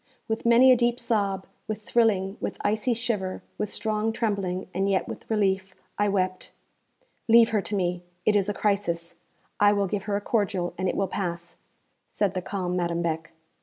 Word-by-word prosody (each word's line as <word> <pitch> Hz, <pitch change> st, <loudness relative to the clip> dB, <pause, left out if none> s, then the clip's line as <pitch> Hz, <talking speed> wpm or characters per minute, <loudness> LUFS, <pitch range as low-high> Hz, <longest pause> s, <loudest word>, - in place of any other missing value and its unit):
With 225 Hz, +1 st, -2 dB
many 245 Hz, +3 st, +7 dB
a -, -, +8 dB
deep 240 Hz, 0 st, +1 dB
sob, 200 Hz, -6 st, 0 dB, 0.2 s
with 215 Hz, 0 st, -4 dB
thrilling, 210 Hz, -5 st, +2 dB
with -, -, -4 dB
icy 215 Hz, +4 st, +1 dB
shiver, 215 Hz, -5 st, -2 dB, 0.2 s
with 210 Hz, -, -1 dB
strong 215 Hz, +1 st, -1 dB
trembling, 200 Hz, -5 st, -1 dB
and 195 Hz, +2 st, 0 dB
yet 190 Hz, -1 st, +1 dB
with -, -, -8 dB
relief, 195 Hz, -3 st, 0 dB, 0.2 s
I 205 Hz, 0 st, +1 dB
wept. 185 Hz, -2 st, -1 dB, 0.7 s
'Leave 230 Hz, 0 st, +7 dB
her 215 Hz, -2 st, +1 dB
to 205 Hz, -, -3 dB
me; 180 Hz, -2 st, 0 dB, 0.2 s
it 210 Hz, -, +4 dB
is 205 Hz, 0 st, +2 dB
a -, -, 0 dB
crisis. 175 Hz, -5 st, -1 dB, 0.5 s
I 205 Hz, 0 st, +6 dB
will 200 Hz, -1 st, +1 dB
give 195 Hz, +1 st, -3 dB
her 205 Hz, -1 st, -1 dB
a -, -, +1 dB
cordial, 200 Hz, -5 st, 0 dB
and 185 Hz, 0 st, -1 dB
it -, -, -2 dB
will 195 Hz, -, +1 dB
pass,' 175 Hz, -2 st, -4 dB, 0.5 s
said 200 Hz, -3 st, 0 dB
the 185 Hz, -, -2 dB
calm 180 Hz, -1 st, -3 dB
Madame 170 Hz, -1 st, 0 dB
Beck. 165 Hz, 0 st, -2 dB
200 Hz, 185 wpm, -26 LUFS, 185-215 Hz, 0.7 s, a